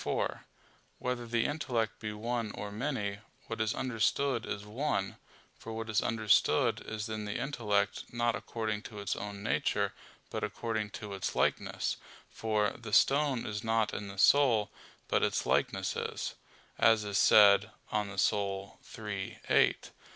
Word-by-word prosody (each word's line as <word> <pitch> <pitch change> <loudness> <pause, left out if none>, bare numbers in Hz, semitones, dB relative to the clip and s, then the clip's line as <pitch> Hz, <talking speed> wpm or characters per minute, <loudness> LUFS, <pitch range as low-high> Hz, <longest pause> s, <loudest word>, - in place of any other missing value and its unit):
4: - - -2 0.5
Whether 125 -1 -3
the 115 0 +1
intellect 125 -7 -1
be 105 -1 -4
one 115 +1 -2
or 105 - -5
many, 105 -4 -2 0.3
what 115 -1 -4
is 110 -1 0
understood 130 0 0
is 100 0 -4
one; 105 -3 -2 0.4
for 115 - -7
what 115 0 -4
is 105 - +3
understood 110 -2 +3
is 110 0 -4
in 110 -1 -4
the 105 - -3
intellect, 110 -6 0
not 120 -1 +1
according 110 -3 -3
to 105 - -10
its 100 0 -2
own 100 0 -6
nature, - - 0 0.4
but - - -3
according 110 -3 -2
to 105 -1 -7
its 95 - -3
likeness; - - 0 0.3
for 105 -2 0
"the 115 -3 -8
stone 140 +1 +4
is 105 +1 -4
not 110 -1 +1
in 105 - -4
the 100 0 -9
soul, 110 -1 +5 0.4
but - - +2
its - - +1
likeness - - +1
is," - - -3 0.5
as 115 -2 +5
is 100 -1 0
said, 105 0 +7 0.2
De - - -3
Anima 100 -2 -1 0.8
iii, 105 -3 -4
8. - - +3
110 Hz, 150 wpm, -31 LUFS, 105-120 Hz, 0.8 s, said